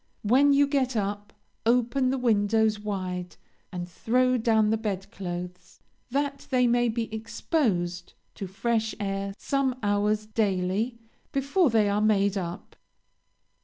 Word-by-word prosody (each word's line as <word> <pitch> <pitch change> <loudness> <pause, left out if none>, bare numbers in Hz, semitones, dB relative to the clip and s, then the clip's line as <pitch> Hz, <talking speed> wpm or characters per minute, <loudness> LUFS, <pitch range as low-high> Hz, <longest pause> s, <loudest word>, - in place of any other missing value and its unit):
When 265 +7 +5
you 285 +1 +5
get 270 -3 0
up, 205 0 -2 0.3
open 245 +2 +2
the 265 - 0
windows 220 -2 +2
wide, 185 -4 -4 0.4
and 175 -2 -5
throw 255 +8 +1
down 220 -2 +3
the 220 - +2
bed 200 -3 -4
clothes, 180 -1 -7 0.3
that 280 +1 -2
they 255 -2 +3
may 240 0 +3
be 225 -1 -3
exposed 220 - -1 0.2
to 195 - -6
fresh 220 +3 -1
air 195 -1 -3
some 275 -2 0
hours, 205 +1 +1
daily, 210 +2 0 0.3
before 280 +5 +2
they 220 -3 +3
are 205 +1 +1
made 200 -2 +3
up. 180 0 -5
215 Hz, 130 wpm, -27 LUFS, 195-245 Hz, 0.4 s, When